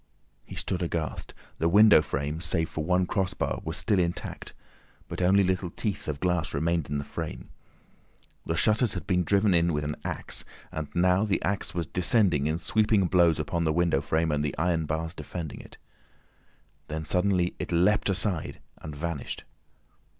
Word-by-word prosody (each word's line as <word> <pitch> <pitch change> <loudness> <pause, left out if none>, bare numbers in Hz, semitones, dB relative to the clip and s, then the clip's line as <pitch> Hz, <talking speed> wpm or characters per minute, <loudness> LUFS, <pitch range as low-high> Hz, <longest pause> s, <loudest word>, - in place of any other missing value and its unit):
He - - -10
stood 95 - -2
aghast. 80 -5 -3 0.2
The 80 - +2
window 105 -1 +7
frame, 75 +1 -3
save 80 -2 +2
for 75 - -3
one 90 +2 +2
crossbar, 95 +1 -2
was 80 +1 -4
still 105 -4 +2
intact, 85 -1 -3 0.6
but - - -5
only 95 +2 +4
little 95 -1 0
teeth 100 +3 -4
of 75 -2 -3
glass 90 -3 0
remained 80 +1 0
in 75 - -1
the 70 - -3
frame. - - -6 0.9
The - - -2
shutters 110 0 +2
had 90 - -5
been 90 -2 +1
driven 100 +3 +3
in 85 -1 +3
with 75 0 -1
an 75 0 -3
axe, - - -1 0.3
and 80 -1 -4
now 90 +3 +3
the 105 -3 +1
axe 100 -3 -2
was 85 -1 -1
descending 90 - +2
in 80 +1 0
sweeping 105 +3 +2
blows 85 -3 +4
upon 85 +3 -1
the 80 - +2
window 85 -4 +2
frame 80 +2 0
and 75 0 0
the 75 - -3
iron 80 -1 0
bars 80 +1 -2
defending 85 -5 -6
it. - - -15 1.1
Then 80 +1 -4
suddenly 90 0 +1
it - - -4
leapt 90 +5 +3
aside 95 -4 -1 0.2
and 75 -2 -8
vanished. 80 -2 -4
85 Hz, 170 wpm, -27 LUFS, 80-95 Hz, 1.1 s, window